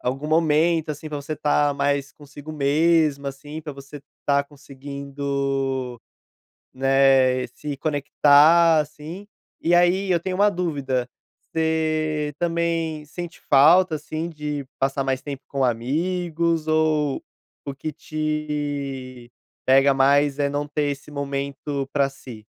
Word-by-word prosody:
algum 135 +4 -3
momento 160 0 +2
assim 150 +1 -6
pra 150 - -4
você 155 +2 -5
tá 145 -1 +1
mais 140 -1 -1
consigo 145 +1 -11
mesma 150 -1 +2
assim, 145 +3 -9
pra 150 -1 -7
você 140 +1 -11 0.2
estar 140 0 +1
conseguindo, 140 -2 -4 0.7
né, 135 -1 +3
se 150 -1 -5
conectar 150 +3 +4
assim. 155 +6 -6 0.3
E 170 - +1
aí 180 +3 +3
eu 175 - +3
tenho 185 +2 -3
uma 205 +2 +4
dúvida: 140 -8 -2 0.3
você 155 -2 -1
também 165 -2 -1
sente 175 +3 -8
falta, 160 +5 +6
assim, 155 +2 -4
de 150 -3 -4 0.2
passar 135 0 0
mais 135 -1 -1
tempo 140 -2 -7
com 140 -1 -1
amigos 165 +6 -1
ou 155 -2 +1 0.4
o 140 - -4
que 155 +3 -5
te 145 -5 -4 0.3
pega 135 +1 +5
mais 140 +1 +3
é 140 - +1
não 145 +1 -2
ter 150 0 -1
esse 140 +1 -8
momento 140 0 -4
pra 140 -1 +2
si? 120 -5 -12
145 Hz, 125 wpm, -23 LUFS, 140-155 Hz, 0.7 s, falta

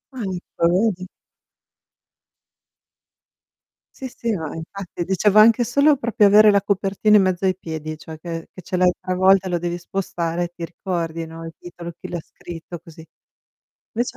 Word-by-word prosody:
Ah, 250 - -5 0.5
lo 200 +6 +3
vedi? 185 0 -8 2.9
Sì, 265 - -6
sì, 235 -1 -3
no, 160 -7 -3
infatti 175 +2 -6
dicevo 195 +3 +2
anche 230 +3 +7
solo 280 +5 +4
proprio 230 -4 +2
avere 210 +1 +7
la 200 -1 +3
copertina 200 +1 +2
in - - +5
mezzo 185 0 0
ai 185 -2 +2
piedi, 155 -3 -6
cioè 160 0 -10
che 165 -1 -6
che 185 - -11
c'è 185 - -4
l'hai 180 0 +4
travolta, 190 +1 +3
lo 175 -1 0
devi 175 0 -3
spostare, 175 -2 -3
ti 170 -1 -7
ricordi, 165 -2 -4
no, 165 0 -9
il 165 - -8
titolo, 170 -1 -9
chi - - -8
l'ha 175 - -3
scritto, 170 +1 -10
così. 165 -2 -14 0.9
Invece 240 +2 -2
180 Hz, 155 wpm, -21 LUFS, 170-200 Hz, 2.9 s, anche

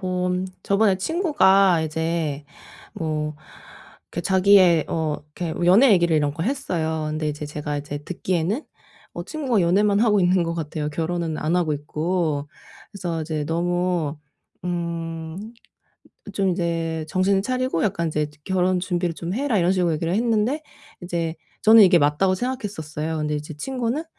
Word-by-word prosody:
뭐 180 -1 -1 0.3
저번에 200 -1 +3
친구가 195 - +3
이제 160 -2 -2 0.5
뭐 155 -1 -3 0.8
이렇게 - - -3
자기의 185 -3 +5
어 155 -2 -1 0.2
이렇게 170 -3 -3
연애 215 +7 +7
얘기를 170 -3 +3
이런 145 -1 +1
거 165 - -3
했어요. 165 - -2
근데 155 0 -2
이제 150 0 -5
제가 150 0 -4
이제 145 0 -5
듣기에는 180 - -2 0.5
어 - - -4
친구가 270 -9 0
연애만 200 +4 +3
하고 215 -3 +4
있는 180 0 +3
것 170 0 -2
같아요 155 -2 -3
결혼은 165 0 -2
안 160 +3 0
하고 165 -4 +1
있고. 150 0 -2 0.4
그래서 175 -5 -4
이제 155 -1 -3
너무 175 -1 -1 0.5
음 170 +3 -4 0.8
좀 195 0 0
이제 165 -3 -1
"정신을 195 +1 +2
차리고 255 -6 -1
약간 170 -4 0
이제 150 -1 -1
결혼 185 -1 +1
준비를 175 -2 -1
좀 175 +3 -4
해라." 255 -5 +1
이런 175 +1 +3
식으로 180 -3 +1
얘기를 165 +3 -1
했는데 230 +6 +1 0.4
이제 170 -2 -2 0.3
저는 220 +1 +8
'이게 180 -3 +6
맞다.'고 150 +6 +2
생각했었어요. 160 - -4
근데 150 0 -1
이제 150 +1 -5
친구는 255 - -2
175 Hz, 320 characters per minute, -23 LUFS, 160-195 Hz, 0.8 s, 저는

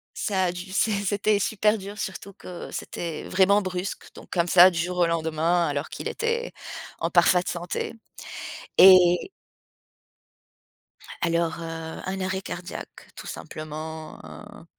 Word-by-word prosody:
ça 190 -3 0
a 175 - 0
du 180 +2 -8
c'é 220 +2 +2
c'était 205 +1 +2
super 210 +1 +2
dur, 200 +2 -8
surtout 195 +1 -5
que 180 -1 -9
c'était, 165 -3 -5
heu, - - -8
vraiment 195 +2 +4
brusque 185 +1 -4
donc - - -13
comme 170 -1 +1
ça, 180 +1 +8
du 170 - -4
jour 180 +2 -2
au 175 - +4
lendemain, 165 +1 +1
alors 145 0 -2
qu'il - - -5
était 470 +2 -2 0.5
en - - 0
parfaite 180 0 +4
santé. 175 +5 -3 0.8
Et 185 - +7 1.9
Alors, 170 -1 +1
heu, 165 -1 -6
un 190 0 -3
arrêt 190 0 -1
cardiaque, 175 -2 -8
tout - - -9
simplement, 155 0 -7
heu 210 -4 -12
180 Hz, 140 wpm, -25 LUFS, 165-195 Hz, 1.9 s, ça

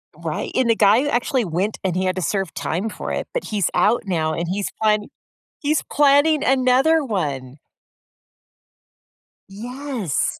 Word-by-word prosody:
Right. - - -4
And 255 -3 +2
the 230 - +4
guy 215 +3 +5
who 290 - -1
actually 245 -1 0
went 185 +6 -2
and 185 -2 -1
he 185 0 0
had 185 - 0
to - - -1
serve 190 -2 -2
time 190 +8 -2
for - - -6
it, - - -3
but - - -3
he's 205 -6 -1
out 210 +7 +2
now 160 -4 -1
and 170 +2 -3
he's 195 +3 -2
plani 210 -1 +2 0.5
he's 305 -2 0
planning 290 +1 +4
another 265 +4 +3
one! 145 - -3 1.9
Yes. 240 - -3
215 Hz, 155 wpm, -21 LUFS, 185-265 Hz, 1.9 s, guy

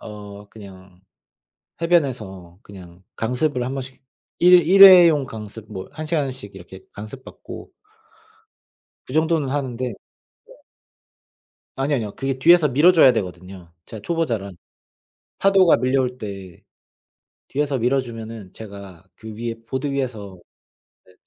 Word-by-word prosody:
...어 105 -1 -11
그냥 95 -3 -15 0.8
해변에서 110 - -1
그냥 90 -2 -14
강습을 125 +3 -1
1 130 - -4
번씩 130 -1 -7 0.4
일 180 0 +6
일회용 180 -7 +8
강습 110 -1 -10
뭐 95 -1 -7
1 155 +1 -7
시간씩 135 - -3
이렇게 95 0 -12
강습 110 +6 -10
받고 - - -11 1.4
그 130 - -10
정도는 160 -2 +1
하는데 130 -3 -3
네. 120 - -7 1.8
아니 140 +2 -1
아니요. 110 -6 -3
그게 135 -1 -3
뒤에서 165 +2 +5
밀어 150 +8 +4
줘야 145 -7 +6
되거든요 90 -4 -7
제가 110 - -9
초보자라. 120 -12 -2 0.9
파도가 195 -3 +4
밀려올 130 0 -1
때 95 -4 -9 0.9
뒤에서 140 -1 -2
밀어 130 +3 +1
주면은 115 -5 -9
제가 100 -5 -11
그 110 0 -10
위에 115 0 -4
보드 130 +4 -4
위에서 110 -9 -5 0.7
네 90 - -22
120 Hz, 250 characters per minute, -21 LUFS, 100-145 Hz, 1.8 s, 일회용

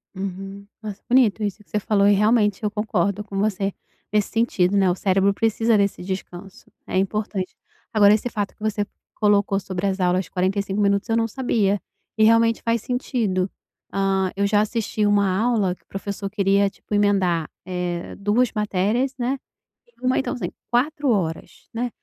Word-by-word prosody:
Uhum, 195 +1 -6 0.2
negócio 205 -2 -7
bonito 240 -4 +4
isso 210 +1 -3
que - - -36
você 210 - +1
falou 200 -1 +2
e 205 - +6
realmente 210 0 +3
eu 210 - +1
concordo 205 -1 -1
com 195 -1 -5
você 200 -1 0 0.4
nesse 210 -1 +2
sentido, 205 -4 +1
né, 195 -1 +4
o - - +2
cérebro 195 +1 +2
precisa 225 +1 +2
desse 200 -3 +1
descanso, 185 0 -7
é - - -5
importante 195 -1 -2 0.4
agora, 210 -2 +6
esse 220 +3 0
fato 205 -3 -3
que - - -33
você 210 -1 -1 0.3
colocou 205 -1 +2
sobre 190 0 -3
as 190 0 -1
aulas 180 +1 +2
de - - -19
45 195 +2 -1
minutos 200 +1 +1
eu 225 - +2
não 225 0 +2
sabia, 210 -5 0 0.3
e 220 - +3
realmente 230 +1 +4
faz 230 -1 0
sentido, 220 -7 -1 0.4
hã, 195 -1 +1
eu 200 0 +1
já 205 0 +3
assisti 215 0 -1
uma 200 -2 +3
aula 215 -4 +1
que - - -18
o - - -41
professor 200 0 -5
queria 200 0 +2
tipo 210 - -11
emendar, 190 -6 +2 0.2
eh, 180 -1 -3
2 215 +5 +2
matérias, 210 +5 0
né, 260 +2 -1 0.6
uma 255 0 +2
então - - -2
assim, 245 - -4 0.2
4 285 +3 +1
horas, 175 -7 -2
né, 245 +2 -2
205 Hz, 175 wpm, -23 LUFS, 195-220 Hz, 0.6 s, e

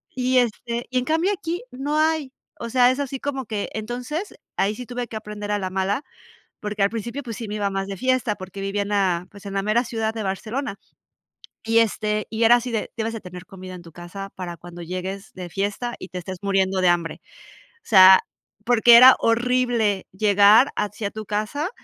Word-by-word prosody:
Y, 255 0 +1
este, 235 0 -2
y 255 0 +1
en - - -2
cambio 325 +6 +1
aquí 345 -2 -4
no 280 +4 -2
hay, 315 -3 +1 0.3
o 235 - -5
sea, 250 +1 +5
es 260 - -3
así 275 -1 -4
como 270 -2 -3
que 210 -2 -3
Entonces, 250 - -5 0.2
ahí 200 +2 +1
sí 250 +2 -7
tuve 245 -1 -4
que 220 - -5
aprender 210 -1 -6
a 205 - 0
la 190 -1 -3
mala, 195 +7 -1 0.6
porque 210 -1 -2
al 200 - +3
principio, 235 +5 -5
pues, 230 -4 -6
sí 230 - -6
me 210 - -4
iba 205 -1 0
más 195 0 -3
de 195 -1 -6
fiesta, 255 -1 +1
porque 190 0 -9
vivía 195 +1 -1
en 200 - -7
la, 185 -4 +1
pues, 205 -1 -14
en 195 - -6
la 195 - 0
mera 215 +3 +2
ciudad 225 -1 -2
de 225 - -4
Barcelona. 215 +4 -3 0.9
Y, 225 0 +3
este, 215 -1 0
y 225 +1 -3
era 235 +2 +7
así 245 +1 -3
de, 220 - -3
debes 225 +1 -2
de 225 - -5
tener 180 0 -10
comida 185 -1 -10
en 180 - -9
tu 165 -1 -14
casa 175 +4 -8
para 175 -2 -6
cuando 175 +1 -10
llegues 185 +3 -6
de 180 -1 -7
fiesta 205 +6 -3
y 185 - -9
te 185 - -6
estés 185 +1 -6
muriendo 195 -1 +1
de 180 - +5
hambre. 170 -2 -1 0.6
O - - -28
sea, 190 -2 +8 0.4
porque 235 0 +7
era 255 +2 +10
horrible 235 -4 +1
llegar 205 +6 +5
así 205 +1 -3
a 200 - -2
tu 215 0 -7
casa, 215 - -2
215 Hz, 215 wpm, -23 LUFS, 195-245 Hz, 0.9 s, era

